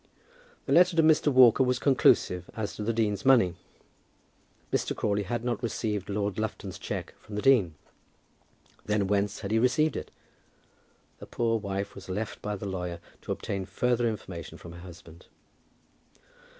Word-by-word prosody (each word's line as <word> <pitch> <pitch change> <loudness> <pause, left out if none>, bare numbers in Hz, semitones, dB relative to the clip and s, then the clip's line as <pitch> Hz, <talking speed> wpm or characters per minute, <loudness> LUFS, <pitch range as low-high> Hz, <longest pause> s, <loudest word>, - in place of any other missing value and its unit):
The - - -4
letter 180 0 +5
to 165 - +5
Mr. 155 -1 +4
Walker 130 -2 +6
was 125 -1 +1
conclusive 90 - +3
as 110 -2 -4
to - - -7
the 110 +2 0
dean's 110 -3 0
money. 120 -10 +5 1.2
Mr. - - 0
Crawley 105 -1 0
had 115 +4 -3
not 120 -2 -1
received 105 -4 -3
Lord 100 0 -2
Lufton's 105 -3 -4
cheque - - -5
from 105 - -10
the 105 - -2
dean. 110 -12 +4 1.1
Then 105 -1 0
whence 100 +1 0
had 100 -1 -4
he 110 - +3
received 150 +6 +2
it? - - -5 1.1
The - - -10
poor 115 -1 0
wife 100 -1 -4
was 100 - -11
left 105 +3 -4
by 105 0 -3
the 100 - -7
lawyer 90 -3 -4 0.2
to - - -6
obtain 95 -1 -3
further 120 +4 +1
information 90 -6 -7
from 85 - -11
her 85 - -11
husband. 85 -1 -13
105 Hz, 160 wpm, -28 LUFS, 95-120 Hz, 1.2 s, Walker